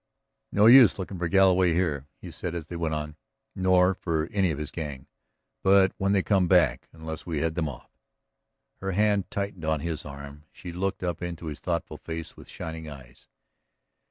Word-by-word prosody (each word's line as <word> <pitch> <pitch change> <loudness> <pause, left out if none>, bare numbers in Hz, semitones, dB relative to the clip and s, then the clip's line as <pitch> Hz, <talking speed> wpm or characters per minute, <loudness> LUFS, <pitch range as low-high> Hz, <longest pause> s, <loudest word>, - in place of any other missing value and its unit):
"No 105 - +4
use 120 0 +8
looking 95 -1 -6
for 85 - 0
Galloway 95 -1 +4
here," 75 -6 -1
he - - -9
said 85 -1 -5
as 85 -3 -4
they 85 - -8
went 80 -2 -1
on. 75 0 -5 0.4
"Nor 95 0 +3
for 80 -4 -2
any 95 -3 +2
of 75 - -2
his 75 -1 -5
gang. 70 -6 -6 0.6
But, 95 0 +5
when 95 0 +1
they 100 -2 +2
come 95 -4 +2
back... - - +3
unless 80 0 -8
we 80 -3 -2
head 80 0 0
them 80 -3 -1
off.. 65 - -11 0.5
." - - -55
Her 95 0 -2
hand 105 0 +1
tightened 100 -4 -4
on 80 -2 0
his 80 -2 -4
arm. 70 +1 -10
She 90 - -9
looked 95 +2 -3
up 85 -2 -2
into 85 -1 -5
his 75 -3 -5
thoughtful 85 -2 -3
face 80 -1 -7
with - - -14
shining 80 -1 -7
eyes. 65 -4 -13
85 Hz, 190 wpm, -27 LUFS, 80-95 Hz, 0.6 s, use